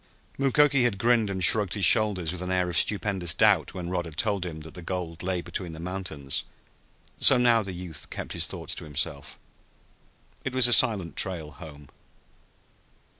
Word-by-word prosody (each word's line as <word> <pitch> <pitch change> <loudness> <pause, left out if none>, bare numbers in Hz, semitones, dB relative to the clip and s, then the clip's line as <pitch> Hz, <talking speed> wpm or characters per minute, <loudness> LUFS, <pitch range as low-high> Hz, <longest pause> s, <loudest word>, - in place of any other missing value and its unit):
Mukoki 140 0 +3
had 120 -5 0
grinned 115 0 +2
and 95 -1 -3
shrugged 105 0 +4
his 100 - +4
shoulders 100 -8 +4
with 90 -1 -5
an 90 - -4
air 90 -1 0
of - - -5
stupendous 95 -5 0
doubt - - +2
when 90 -2 -6
Rod 90 -1 -3
had 80 -2 -11
told 100 -3 -1
him 80 -2 -8
that 80 0 -12
the 90 - -10
gold 85 -2 -5
lay 90 -1 -2
between 85 -1 -6
the 80 - -10
mountains, 85 -6 -3 0.8
so 135 - +6
now 120 -2 +3
the 100 -2 -5
youth 90 -3 -7
kept - - -6
his - - 0
thoughts - - -5
to - - -5
himself. 70 -2 -4 1.1
It 135 -1 -5
was 130 -2 +7
a 120 - +3
silent 105 -8 +2
trail 85 -5 -3
home. 75 -2 -12
90 Hz, 180 wpm, -26 LUFS, 85-105 Hz, 1.1 s, was